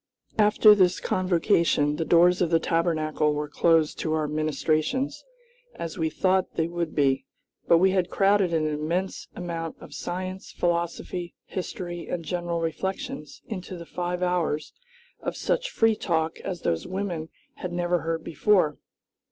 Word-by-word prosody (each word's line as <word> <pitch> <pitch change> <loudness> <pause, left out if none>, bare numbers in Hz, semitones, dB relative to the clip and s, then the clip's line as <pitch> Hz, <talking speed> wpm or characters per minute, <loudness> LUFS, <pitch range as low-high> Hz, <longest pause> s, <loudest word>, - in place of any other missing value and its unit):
After 210 0 +7
this 185 -3 +3
convocation 170 -5 +2
the 165 - -1
doors 175 +2 +5
of 175 - +2
the 165 - +4
Tabernacle 155 -3 +1
were 150 0 -2
closed 160 +1 +2
to 155 - -1
our 155 -1 0
ministrations, 155 - 0 0.5
as 165 +1 -6
we 160 -1 +1
thought 185 +3 +1
they 160 - +1
would 170 -1 -3
be, 135 -2 +2 0.4
but 170 - +6
we 190 +3 +4
had 185 -2 +1
crowded 195 -2 +3
an 160 -2 +1
immense 160 +5 -2
amount 165 -2 -4
of 145 - -12
science, 185 +5 -5
philosophy, 170 0 -2
history, 175 -2 -5
and 170 -2 -4
general 175 0 -2
reflections 165 -2 -4
into 185 -3 -6
the 170 - -8
five 180 +1 -3
hours 175 -4 0 0.5
of - - -4
such - - 0
free 225 - +3
talk 160 -5 -1
as 185 -3 -5
those 80 - -1
women 180 -4 -3 0.3
had 180 - -5
never 175 0 +1
heard 165 +1 -2
before. 165 -2 +2
170 Hz, 150 wpm, -26 LUFS, 160-185 Hz, 0.5 s, After